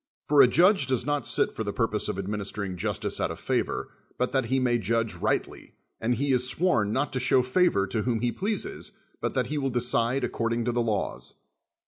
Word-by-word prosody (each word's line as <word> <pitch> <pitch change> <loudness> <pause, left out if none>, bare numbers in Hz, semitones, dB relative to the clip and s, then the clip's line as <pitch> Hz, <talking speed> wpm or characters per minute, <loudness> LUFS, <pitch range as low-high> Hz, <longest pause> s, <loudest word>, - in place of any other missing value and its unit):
For 145 -1 +6
a - - +8
judge 180 - +4
does 130 -2 0
not 145 -4 0
sit - - +2
for 110 - -4
the 100 - -3
purpose 110 -1 -1
of 105 -3 -3
administering 100 -1 -3
justice 85 - -2
out - - +1
of - - -6
favor, - - -1 0.3
but 125 - 0
that 135 -1 +1
he 135 - 0
may 120 -2 +2
judge 115 +1 0
rightly, - - -3 0.2
and 120 +2 0
he 140 +2 0
is 125 0 +2
sworn 125 - +1
not 135 +5 -1
to 130 - 0
show 130 +1 +3
favor 130 - +2
to 105 +3 -2
whom 115 -1 -1
he 120 -1 +1
pleases, 220 - -3 0.3
hut - - -2
that - - +1
he 150 - -1
will 135 -1 0
decide 120 +1 +1
according 115 0 -1
to 120 - +1
the 120 0 0
laws. 110 -4 -2
120 Hz, 210 wpm, -27 LUFS, 110-135 Hz, 0.3 s, a